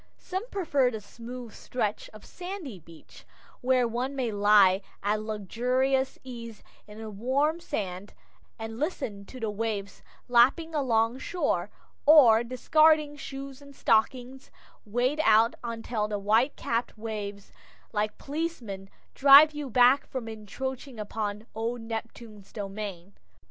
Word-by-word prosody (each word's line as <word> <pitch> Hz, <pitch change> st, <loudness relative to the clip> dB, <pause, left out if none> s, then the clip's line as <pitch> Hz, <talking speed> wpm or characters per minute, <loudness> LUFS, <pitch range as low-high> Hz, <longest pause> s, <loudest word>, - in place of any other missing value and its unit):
Some 380 Hz, +6 st, -5 dB
prefer 285 Hz, -, +1 dB
the 220 Hz, -3 st, -5 dB
smooth 235 Hz, +2 st, -9 dB
stretch 215 Hz, -4 st, -3 dB
of 215 Hz, -1 st, -14 dB
sandy 355 Hz, -, -7 dB
beach, 165 Hz, 0 st, -16 dB, 0.4 s
where 255 Hz, -1 st, +3 dB
one 250 Hz, +4 st, -3 dB
may 250 Hz, -4 st, -1 dB
lie 205 Hz, -2 st, +5 dB, 0.2 s
at 210 Hz, +1 st, 0 dB
luxurious 250 Hz, +6 st, 0 dB
ease 230 Hz, -4 st, -9 dB, 0.2 s
in 210 Hz, 0 st, -12 dB
the 220 Hz, -1 st, -7 dB
warm 270 Hz, +10 st, 0 dB
sand, 195 Hz, -, -5 dB, 0.4 s
and 225 Hz, 0 st, -7 dB
listen 245 Hz, -, -3 dB
to 255 Hz, -, -11 dB
the 220 Hz, -2 st, -2 dB
waves 205 Hz, -2 st, -4 dB, 0.3 s
lapping 260 Hz, +7 st, +4 dB
along 240 Hz, -4 st, +1 dB
shore, 360 Hz, +6 st, -1 dB, 0.4 s
or, 245 Hz, -7 st, +8 dB
discarding 300 Hz, +4 st, +3 dB
shoes 275 Hz, -1 st, -8 dB
and 280 Hz, -1 st, -14 dB
stockings, 250 Hz, +4 st, 0 dB, 0.4 s
wade 245 Hz, +8 st, 0 dB
out 225 Hz, -1 st, +5 dB
until 225 Hz, -2 st, -3 dB
the 210 Hz, -1 st, -2 dB
white 220 Hz, +7 st, +2 dB
capped 230 Hz, 0 st, -2 dB
waves, 205 Hz, -2 st, -6 dB, 0.4 s
like 210 Hz, 0 st, -1 dB
policemen, 265 Hz, -11 st, -5 dB, 0.2 s
drive 280 Hz, +3 st, +8 dB
you 295 Hz, -2 st, -5 dB
back 250 Hz, +3 st, +5 dB
from 255 Hz, -4 st, -5 dB
encroaching 245 Hz, +4 st, -6 dB
upon 210 Hz, 0 st, -4 dB
old 230 Hz, +2 st, -3 dB
Neptune's 225 Hz, -2 st, -8 dB
domain. 200 Hz, -3 st, -6 dB
235 Hz, 130 wpm, -28 LUFS, 210-270 Hz, 0.4 s, or